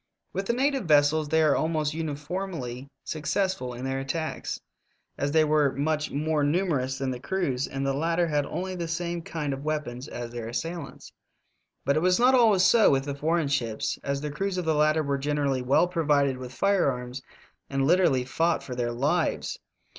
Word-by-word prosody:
With 195 0 -3
the 235 - +2
native 270 -1 +1
vessels 150 0 +3
they 160 +1 +3
were 150 -2 +4
almost 155 -2 0
uni 160 -2 -3
formly 150 -5 -5
successful 155 -4 -2
in 125 +2 -6
their 135 0 -1
attacks, 155 +4 -3 0.6
as 140 +1 -1
they 160 +1 +5
were 150 -2 +2
much 150 +2 -1
more 150 +1 0
numerous 145 -5 0
than 135 -1 -2
the 125 - -5
crews, 140 -5 -1
and 135 0 -3
the 135 - +1
lat 165 +4 0
ter 175 - +3
had 145 -3 0
only 185 +1 -4
the 170 -2 -3
same 170 +1 -2
kind 150 -4 -3
of 135 +1 -6
weapons 150 -4 -3
as 120 -4 -6
their 120 -2 -5
assailants. 165 +8 -5 0.7
But 140 +2 +2
it - - +2
was 180 +3 +3
not 250 +2 +5
always 220 -7 +5
so 225 +2 +6
with 135 -1 +2
the 140 - -3
foreign 160 +2 0
ships, 115 -6 -1
as 140 0 -2
the 150 0 -3
crews 195 +5 -2
of 180 - -2
the 160 - +2
latter 155 +1 +3
were 140 -1 -1
gen 145 +2 -1
erally 140 -3 +1
well 135 +7 +3
provided 145 -6 +1
with 125 -1 -7
firearms 135 -8 0 0.5
and 135 -1 0
literally 155 -6 +3
fought 165 +5 0
for 130 - -6
their 120 -1 -1
lives. 145 +8 0
150 Hz, 195 wpm, -27 LUFS, 135-170 Hz, 0.7 s, so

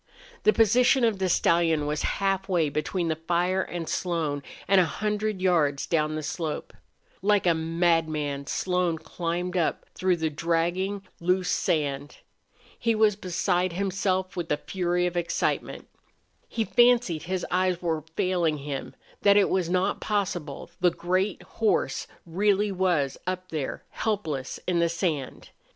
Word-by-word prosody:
The - - +7
position 245 +4 +4
of 225 -4 +2
the 190 -1 +1
stallion 165 -3 +3
was 150 +1 -1 0.2
halfway 190 -5 +1
between 165 +4 -2
the 160 - 0
fire 175 +3 0
and 175 -3 -5
Slone, 160 -5 -1 0.3
and 195 0 +6
a - - +3
hundred 210 +2 -2
yards 150 -7 +2
up 155 -2 +3
the 155 - -3
slope. 155 0 -4 0.5
Like 205 0 +3
a 175 - +5
madman 160 -4 0
Slone 180 -1 0
climbed 175 +2 -3
up 170 -3 0
through 185 -1 +1
the 160 -1 -1
dragging, 175 +5 -1 0.2
loose 180 +1 +1
sand. 145 -2 -1 0.6
He 230 -1 +1
was 215 -2 +4
beside 180 -1 0
himself 190 0 -1
with 175 -2 -4
a 150 - +2
fury 180 0 -1
of 175 0 -2
excitement. 175 -1 -1 0.6
He 225 -1 -1
fancied 240 -10 +4
his 185 +1 -2
eyes 185 0 +1
were 165 -3 -1
failing 175 -4 +1
him, 140 -1 -5 0.3
that 200 0 +6
it 200 - +4
was 185 -3 +1
not 185 +2 0
possible 185 -9 -2
the 180 - +5
great 185 +3 -1
horse 220 -2 0 0.2
really 200 +4 +1
was 175 -8 0
up 185 0 -3
there, 150 -4 -4
helpless 160 - -2
in 180 -2 +2
the 170 0 +3
sand. 165 -6 -3
180 Hz, 145 wpm, -26 LUFS, 160-190 Hz, 0.6 s, The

